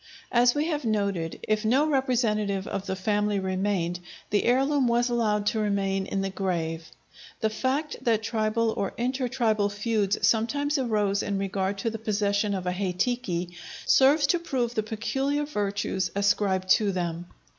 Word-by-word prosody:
As 245 +1 +4
we 295 +1 +1
have 300 -3 -2
noted, 200 -7 -1
if 215 0 0
no 255 +7 +3
representative 230 -9 0
of 195 0 -4
the 190 - -1
family 205 +1 0
remained, 185 -2 -1 0.3
the 205 - +2
heirloom 270 +2 +3
was 240 +1 +2
allowed 210 -3 +1
to 220 +1 +1
remain 195 -2 0
in 195 - -1
the 195 - -2
grave. 165 -4 -3 0.5
The 220 - +1
fact 270 +7 -1
that 225 -2 +1
tribal 220 0 0
or 200 -3 -3
intertribal 240 -4 0
feuds 210 -1 0
sometimes 285 +6 +1
arose 210 -5 +1
in 200 - -2
regard 195 0 -1
to 225 +3 -2
the 225 - -5
possession 205 -1 0
of 185 -1 -4
a 180 - 0
hei 185 0 -2
tiki 180 -5 -2 0.3
serves 285 +3 +5
to 340 +5 +2
prove 255 -8 -2
the 220 - 0
peculiar 270 +7 -1
virtues 200 -7 -2
ascribed 200 -2 +1
to 205 0 +4
them. 175 -2 -3
210 Hz, 160 wpm, -26 LUFS, 195-240 Hz, 0.5 s, serves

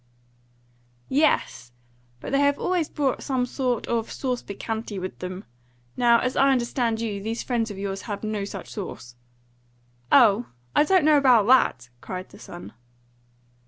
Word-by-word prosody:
"Yes; 275 - +1 0.5
but - - -6
they 275 - +2
have 285 0 +3
always 355 -4 -1
brought 275 -4 -1
some 260 -3 -1
sort 250 -2 -2
of 230 -1 -2
sauce 255 -2 -2
piquante 220 +1 -5
with 185 0 -6
them. 185 +2 -6 0.5
Now, 235 -1 +5
as 255 +2 -1
I 275 - +4
understand 240 -3 0
you, 210 -3 -3
these 225 +3 -3
friends 235 -3 -1
of 205 - -7
yours 195 0 -4
have 205 +1 -4
no 215 -2 -2
such 200 - -7
sauce." 120 - -7 1.0
"Oh, 235 -3 +5 0.3
I 295 - +5
don't 370 -2 +3
know 305 -1 +6
about 250 -7 +5
that!" 220 - +3
cried 185 0 -6
the - - -15
son. 175 -11 -10
235 Hz, 155 wpm, -25 LUFS, 200-265 Hz, 1.0 s, know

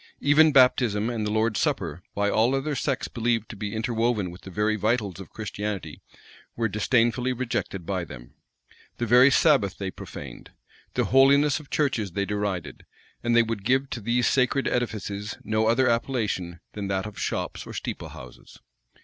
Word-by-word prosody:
Even 150 +2 +5
baptism 120 -5 +4
and 110 -3 -2
the - - -2
Lord's 110 0 +1
supper, 75 +4 -1
by 100 0 +1
all 115 +6 +2
other 140 +3 -1
sects 135 0 -1
believed 115 -2 -1
to - - -7
be 105 +1 -5
interwoven 115 -4 0
with 90 - -12
the - - -10
very 105 +3 0
vitals 105 -3 -1
of 95 - -9
Christianity, 105 -6 -5 0.5
were 115 -1 0
disdainfully 120 +4 +1
rejected 115 -7 -3
by 95 -1 -2
them. - - -11 0.6
The 120 - -1
very 125 +4 +7
Sabbath 135 - +3
they 95 -1 -4
profaned. - - -10 0.4
The - - +2
holiness 140 +2 +5
of 150 - -14
churches 115 - 0
they 100 +1 -1
derided; 100 -9 -3 0.4
and 120 0 +2
they 120 - +6
would 115 -3 -4
give 130 +4 +1
to 120 - -4
these 120 +3 +1
sacred 135 +1 +2
edifices 105 -3 -3
no 110 0 +1
other 130 +3 +3
appellation 110 -8 -1
than 100 -2 -4
that 95 0 -1
of 105 -2 -8
shops - - -3
or - - -7
steeplehouses. 65 -1 -8
110 Hz, 165 wpm, -25 LUFS, 100-125 Hz, 0.6 s, very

